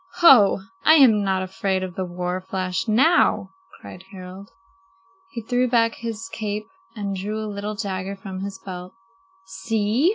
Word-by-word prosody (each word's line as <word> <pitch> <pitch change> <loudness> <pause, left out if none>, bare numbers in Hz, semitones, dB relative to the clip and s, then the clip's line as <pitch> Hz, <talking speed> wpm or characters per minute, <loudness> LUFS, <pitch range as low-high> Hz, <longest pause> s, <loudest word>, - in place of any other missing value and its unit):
"Ho, 250 - +6 0.2
I 315 - +7
am 230 -9 +6
not 190 -1 0
afraid 190 0 -2
of 185 -1 -5
the 185 +1 -3
war 180 +1 -4
flash 185 +1 -3
now," 235 - +3 0.3
cried 185 - -11
Harald. 190 0 -10 0.8
He 230 - -7
threw 245 +2 +1
back 230 -2 +2
his 230 -1 -6
cape 210 -1 -3 0.3
and 200 -2 -3
drew 205 +3 -4
a 220 - -3
little 210 0 -5
dagger 195 -2 -4
from 190 -1 -8
his 195 0 -5
belt. 185 -1 -9 0.5
"See!" 210 - 0
200 Hz, 155 wpm, -23 LUFS, 190-225 Hz, 0.8 s, I